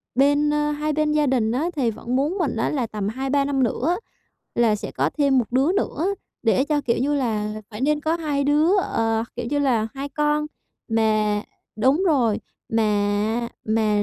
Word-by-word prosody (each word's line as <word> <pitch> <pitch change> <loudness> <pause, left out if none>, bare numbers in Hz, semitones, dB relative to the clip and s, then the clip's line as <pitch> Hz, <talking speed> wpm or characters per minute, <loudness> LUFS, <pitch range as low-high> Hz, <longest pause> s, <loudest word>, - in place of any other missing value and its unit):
bên 285 +2 +3
ơ, 295 0 +1
hai 300 +1 -1
bên 305 0 +1
gia 300 -1 +2
đình 235 -4 +1
á 285 +8 0
thì 250 -6 +1
vẫn 235 +3 -4
muốn 300 +9 0
mình 310 -9 -1
á 225 - 0
là 255 -6 -1
tầm 210 -2 -4
2-3 270 +4 0
năm 275 -2 +1
nữa 285 +9 0 0.6
là 230 -3 +3
sẽ - - -6
có 140 +4 0
thêm 280 -2 +4
một 235 - -1
đứa 270 +7 +3
nữa 380 -3 -1 0.4
để 250 +3 +3
cho, 295 0 0
kiểu 235 - 0
như 280 +4 +1
là, 215 -5 -2
phải 210 +2 -8
nên 295 +2 +1
có 315 +2 0
hai 295 -4 -1
đứa, 305 +7 +3
ờ, 225 - 0
kiểu 240 -1 -3
như 290 - +1
là 240 -6 +1
2 275 +1 -4
con. 300 +1 0 0.4
Mà 215 -2 +1 0.3
đúng 265 - +3
rồi, 245 -10 +2 0.3
mà 215 +1 +1 0.2
mà 215 -1 +1
265 Hz, 195 wpm, -23 LUFS, 220-295 Hz, 0.6 s, thêm